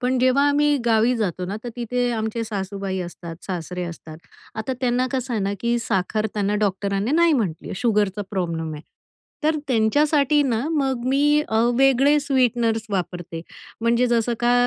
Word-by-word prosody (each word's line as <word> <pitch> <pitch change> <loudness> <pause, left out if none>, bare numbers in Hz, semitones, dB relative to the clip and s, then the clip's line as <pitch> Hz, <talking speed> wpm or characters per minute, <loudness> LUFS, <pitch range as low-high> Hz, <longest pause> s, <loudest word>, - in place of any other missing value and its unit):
पण 255 0 +1
जेव्हा 255 +2 +3
आम्ही 290 0 +3
गावी 230 +1 +3
जातो 185 -5 -2
ना 200 +3 -4
तर 240 - -3
तिथे 245 +1 -1
आमचे 220 +1 -2
सासूबाई 195 -2 -4
असतात, 175 -1 -7
सासरे 180 -1 -4
असतात. 165 -2 -9 0.4
आता 220 +4 -3
त्यांना, 250 0 +1
कसं 260 -1 -2
आहे 210 - 0
ना, 195 - -1
की 235 0 +1
साखर 215 -1 -1
त्यांना 205 -1 0
डॉक्टरांनी 200 +1 0
नाही 335 0 +4
म्हटली 205 - -1
आहे. - - -4
शुगरचा 210 -4 +1
प्रॉब्लेम 165 -4 -2
आहे. 150 - -9 0.6
तर 310 0 +2
त्यांच्यासाठी 290 +5 +3
ना 235 -5 0
मग 270 -6 0
मी 290 +3 +3
अ, 220 - +1 0.2
वेगळे 270 +2 +4
स्वीटनर्स 240 -5 +1
वापरते, 175 -3 -3 0.4
म्हणजे 235 +2 +2
जसं 235 0 +1
का, 240 0 +3
230 Hz, 165 wpm, -22 LUFS, 195-260 Hz, 0.6 s, नाही